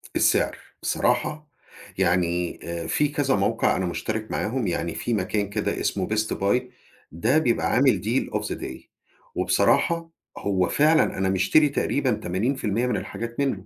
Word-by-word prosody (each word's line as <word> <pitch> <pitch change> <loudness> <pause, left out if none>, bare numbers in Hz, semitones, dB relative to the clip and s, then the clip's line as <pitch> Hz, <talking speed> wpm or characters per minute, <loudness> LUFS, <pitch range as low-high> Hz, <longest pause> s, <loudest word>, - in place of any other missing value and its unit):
السعر، - - +2 0.2
بصراحة 150 0 0 0.5
يعني 90 -1 +1 0.3
في 150 - +2
كذا 145 -2 +1
موقع 100 - +1
أنا 95 - -1
مشترك 110 +5 -3
معاهم، 115 -1 -1
يعني 85 -1 -2
في 120 - -2
مكان 100 0 -1
كده 105 0 -2
اسمه - - -1
Best 110 0 0
Buy، 100 +6 +1 0.5
ده 110 - +1
بيبقى 125 -7 +1
عامل 130 +1 +4
deal 115 +5 -1
of - - -7
the - - -3
day، - - -7 0.5
وبصراحة 165 -1 +2 0.3
هو 95 -3 0
فعلًا 155 -4 +3
أنا 95 0 +1
مِشتري 125 +11 +4
تقريبًا 140 -1 0
80% 110 +4 -1
من 125 - 0
الحاجات 115 +2 -6
منه، 120 -9 -1
110 Hz, 145 wpm, -24 LUFS, 95-135 Hz, 0.5 s, عامل